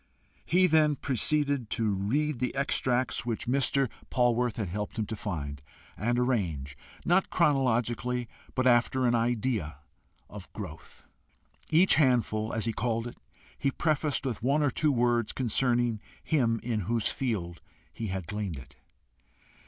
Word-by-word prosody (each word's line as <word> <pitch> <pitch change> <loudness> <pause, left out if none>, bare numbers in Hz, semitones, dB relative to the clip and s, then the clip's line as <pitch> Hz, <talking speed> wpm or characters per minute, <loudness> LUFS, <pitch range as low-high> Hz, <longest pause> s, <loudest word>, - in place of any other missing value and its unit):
He 185 +2 +4
then 155 -3 +4
proceeded 140 -1 0
to 110 -3 +1
read 130 +9 0
the 125 +1 -2
extracts 130 -2 0
which 115 -2 -3
Mr. 135 +1 +2 0.2
Polwarth 120 -2 +2
had 105 -6 -3
helped 105 +3 -4
him 110 - 0
to 110 - -5
find 75 -10 -5 0.3
and 120 +3 0
arrange, 90 - -1 0.3
not 180 +3 +3
chronologically, 125 -5 +1 0.3
but 130 - +1
after 125 +1 +3
an 120 - +3
idea 115 - 0 0.5
of 100 -3 -11
growth. 90 -7 -9 0.6
Each 170 +4 +5
handful, 120 -6 +2
as 110 -1 -2
he 115 - 0
called 115 +1 -1
it, 120 - -8 0.4
he 140 - +1
prefaced 150 -1 0
with 125 -5 -3
one 140 +5 +2
or 145 - +2
two 150 +4 +1
words 120 -3 +1
concerning 120 -2 +1 0.2
him 120 -7 +1
in 115 -2 -1
whose 115 -2 +1
field 95 -10 -3 0.3
he 115 - -4
had 95 -2 -4
gleaned 100 -3 -4
it. 65 - -13
120 Hz, 145 wpm, -29 LUFS, 105-135 Hz, 0.6 s, Each